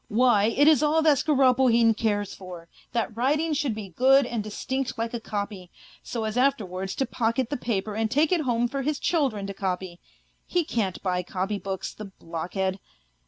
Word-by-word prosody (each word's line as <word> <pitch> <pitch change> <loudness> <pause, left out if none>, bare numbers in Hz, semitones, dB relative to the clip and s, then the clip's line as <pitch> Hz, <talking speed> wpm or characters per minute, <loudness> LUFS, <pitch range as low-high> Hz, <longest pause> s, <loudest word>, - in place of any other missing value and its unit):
Why, 220 -2 +4
it 270 +7 +3
is 310 -5 +6
all 310 +1 +3
that 300 -4 +4
Skoroplehin 255 -5 +4
cares 205 -2 -1
for, 180 -3 -10 0.2
that 230 -2 -2
writing 300 +7 +1
should 285 -6 -1
bo 215 -2 -6
good 270 +2 +5
and 235 -3 -3
distinct 260 +5 -3
like 230 +1 -3
a 235 - -2
copy, 200 -4 -5 0.3
so 230 -2 -4
as 220 +2 -1
after 270 -4 +2
wards 185 +1 -5
to 270 - 0
pocket 235 +1 -1
the - - 0
paper 215 -4 -2
and 220 +1 -1
take 295 +6 +2
it 355 -3 +3
home 240 -3 +1
for 275 +3 -3
his 295 +2 -1
children 270 - 0
to 200 - -5
copy; 185 -2 -4 0.5
he 350 -1 +1
can't 215 - -2
buy 180 -2 0
copybooks, 190 +1 -4
the 215 - -8
blockhead 190 +1 -4
230 Hz, 185 wpm, -26 LUFS, 200-270 Hz, 0.5 s, is